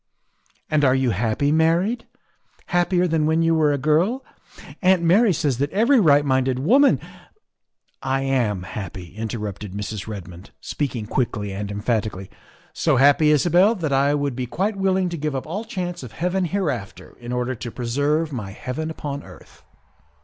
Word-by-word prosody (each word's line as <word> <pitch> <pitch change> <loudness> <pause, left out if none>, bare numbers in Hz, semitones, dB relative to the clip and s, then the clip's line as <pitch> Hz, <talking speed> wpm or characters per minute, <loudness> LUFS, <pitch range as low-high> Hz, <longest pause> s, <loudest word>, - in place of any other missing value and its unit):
"And 155 -1 +1
you 130 -2 +3
are - - -1
happy, 115 +8 0
married? 170 +9 +1 0.6
Happier 175 0 +1
than 160 -2 +1
when 160 +1 +2
you 165 0 +3
were 155 -2 +3
a 145 - +1
girl? 170 - +1 0.6
Aunt 185 -2 +4
Mary 200 +6 +4
says 145 -6 0
that 140 +1 0
every 235 - +3
right 145 -6 +4
minded 130 -1 +1
woman 255 - +4 0.3
" 430 - -46
" - - -45 0.2
I - - -2
am 120 -9 0
happy," 90 -2 -8
interrupted 105 -3 -5
Mrs. 105 0 -5
Redmond, 90 -4 -9
speaking 130 -7 -3
quickly 105 -3 -2
and 100 +1 -4
emphatically, 105 -2 -2 0.2
" - - -31
so 155 -4 +4
happy, 145 +3 +5
Isabel, 175 - +4
that 160 -8 -2
I 140 +2 +3
would 140 -3 -1
be 125 0 -3
quite 200 - -1
willing 190 -1 +1
to 170 - -5
give 150 -1 -3
up 130 - -3
all 200 +8 -5
chance 180 -5 -4
of 125 -4 -10
heaven 180 +7 -1
hereafter 150 - -4
in 120 0 -7
order 125 +1 -1
to 120 0 -6
preserve 145 +7 -1
my 105 -6 -5
heaven 125 +10 -5
upon 145 -3 -5
earth." - - -16
145 Hz, 170 wpm, -22 LUFS, 115-170 Hz, 0.6 s, happy